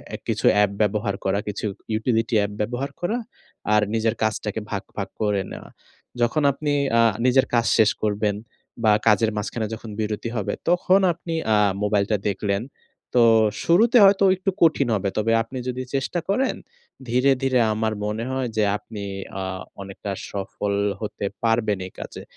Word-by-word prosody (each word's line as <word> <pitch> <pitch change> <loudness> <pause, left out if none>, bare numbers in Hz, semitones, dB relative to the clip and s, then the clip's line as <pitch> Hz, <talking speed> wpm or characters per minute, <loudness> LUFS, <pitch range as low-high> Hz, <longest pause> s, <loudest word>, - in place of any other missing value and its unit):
এ - - -5
কিছু - - -1
অ্যাপ 105 -1 +3
ব্যবহার 105 -1 0
করা, 95 +1 +1
কিছু 105 +1 -4 0.3
ইউটিলিটি 115 +1 0
অ্যাপ 100 0 0
ব্যবহার 125 +6 -3
করা 210 +7 0 0.6
আর 105 - +5
নিজের 115 0 +1
কাজটাকে 110 -1 -1
ভাগ, 100 -2 -2
ভাগ 100 -1 -3
করে 105 -2 +1
নেওয়া। - - -9 0.5
যখন 145 +6 +2
আপনি 145 +2 -3 0.3
আ - - +6 0.2
নিজের 130 +1 +4
কাজ 120 -1 +3
শেষ 110 -2 +5
করবেন 105 -1 0 0.5
বা 110 - +5 0.2
কাজের 110 +1 +4
মাঝখানে 110 +2 -3
যখন 110 0 -8
বিরতি 110 +1 -2
হবে 105 - -2 0.2
তখন 180 +2 +4
আপনি 165 0 -7 0.2
আ - - +4 0.3
মোবাইলটা 105 0 +1
দেখলেন। 100 0 -1 0.5
তো 125 - +5 0.4
শুরুতে 220 +8 +4
হয়তো 195 0 +5
একটু 190 +1 -1
কঠিন 155 -5 +4
হবে। 100 -1 -1
তবে 110 +1 +1
আপনি 120 +3 -8
যদি 125 0 -3
চেষ্টা 135 +6 -1
করেন 255 +7 +1 0.5
ধীরে, 125 +3 +3
ধীরে 130 -1 +2
আমার 110 0 -1
মনে 105 +2 -2
হয় 130 -1 -1
যে 110 - +3
আপনি 105 -1 -9 0.4
আ - - -2 0.4
অনেকটা 100 +1 -6 0.2
সফল 100 0 -3 0.3
হতে 105 -1 -4 0.2
পারবেন 115 -3 +2
এই - - -14
কাজে। - - -8
110 Hz, 160 wpm, -23 LUFS, 105-130 Hz, 0.6 s, আ